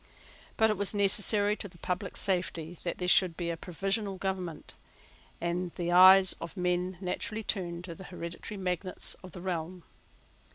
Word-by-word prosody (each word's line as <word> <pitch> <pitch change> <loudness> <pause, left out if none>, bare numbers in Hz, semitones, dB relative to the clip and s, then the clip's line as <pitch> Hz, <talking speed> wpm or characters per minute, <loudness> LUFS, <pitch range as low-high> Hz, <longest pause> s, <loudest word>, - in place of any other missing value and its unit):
But 220 -1 +4
it 210 - -2
was 200 +1 +1
necessary 205 +1 +3
to - - -6
the 175 -2 -17
public 180 +3 -3
safety 175 -3 -1
that 170 - -3
there 180 - -3
should 180 -2 +5
be 170 -1 -2
a - - -3
provisional 195 +4 -3
government; 185 -4 -4 0.7
and 175 +1 -2
the 175 0 -2
eyes 185 +1 +8
of 170 +4 -7
men 180 0 -1
naturally 215 +4 -3
turned 175 -5 -3
to 175 -2 -7
the 190 +2 -11
hereditary 175 +3 -7
magnates 185 0 -3
of 185 - -11
the 180 - -8
realm. 175 -1 -4
180 Hz, 165 wpm, -30 LUFS, 175-195 Hz, 0.7 s, eyes